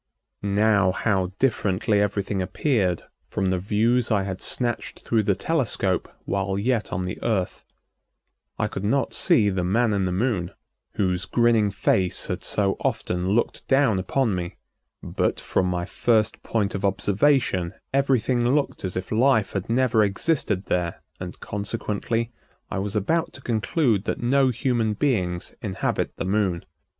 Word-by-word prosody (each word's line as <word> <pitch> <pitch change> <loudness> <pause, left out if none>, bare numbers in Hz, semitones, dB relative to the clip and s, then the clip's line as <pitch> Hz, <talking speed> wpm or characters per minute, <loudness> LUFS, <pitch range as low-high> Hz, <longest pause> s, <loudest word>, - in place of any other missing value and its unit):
Now 100 -1 +3
how 95 -2 0
differently 105 -4 +1
everything 100 -1 -1
appeared 95 - 0 0.3
from 95 -1 0
the 90 - 0
views 115 +5 +1
I 100 -4 +2
had 95 -1 -5
snatched 120 -2 -3
through 115 -2 +1
the 100 -2 +1
telescope 115 - 0 0.2
while 95 0 -1
yet 115 +2 0
on 90 - -2
the 90 0 -5
Earth. 95 -6 -1 0.9
I - - 0
could 95 - -5
not 115 +2 +1
see 105 -2 +4
the 95 -1 -1
"Man 110 +5 +2
in 100 -2 +1
the 90 - -1
Moon," 95 -3 -1 0.4
whose 95 -1 0
grinning 115 0 +3
face 95 -2 +1
had - - -4
so 100 -2 0
often 90 +1 -1
looked 110 +4 0
down 135 -7 +3
upon 115 +4 0
me, 90 -1 -4 0.5
but - - -1
from 95 - 0
my 90 -1 -1
first 110 +2 +1
point 105 -4 -1
of 100 - -4
observation 100 -2 +1 0.2
everything 130 -3 +2
looked 145 - -1
as 95 -1 -2
if 90 - -5
life 110 -2 +3
had 95 +1 -3
never 115 -2 +3
existed 105 - 0
there 90 -2 -2 0.2
and, - - -7
consequently, 110 +2 -2 0.4
I - - -1
was 100 +2 -3
about 165 - 0
to 130 - -10
conclude 115 - +1
that - - -2
no 130 +2 +3
human 120 -3 0
beings 95 -10 -1
inhabit - - -2
the - - -4
Moon. 95 -3 0
105 Hz, 150 wpm, -24 LUFS, 95-120 Hz, 0.9 s, see